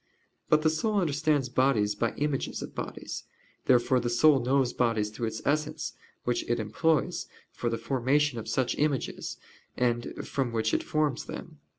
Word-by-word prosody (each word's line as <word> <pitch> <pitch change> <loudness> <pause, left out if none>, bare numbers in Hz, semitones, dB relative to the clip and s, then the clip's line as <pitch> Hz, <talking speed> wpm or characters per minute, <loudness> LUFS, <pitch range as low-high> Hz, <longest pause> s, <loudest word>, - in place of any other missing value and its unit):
But 155 0 +4
the 155 - +4
soul 210 +7 0
understands 150 -4 +1
bodies 120 -5 +2
by 115 +2 -1
images 145 -2 -1
of - - -8
bodies. - - -5 0.4
Therefore 125 0 +4
the 120 0 -1
soul 135 +4 +5
knows 130 0 +2
bodies 115 -4 +1
through 115 +1 -3
its 110 0 -5
essence, 150 +1 0 0.3
which 120 - 0
it 120 - +1
employs 155 +9 +1 0.2
for 120 - -2
the 115 - -1
formation 130 +3 +1
of 110 - -6
such 130 -2 +1
images, 145 -3 -1 0.4
and 120 -1 +1 0.2
from 130 -5 -1
which 110 -1 0
it - - +2
forms 150 -3 0
them. 155 -3 -8
130 Hz, 165 wpm, -29 LUFS, 120-150 Hz, 0.4 s, soul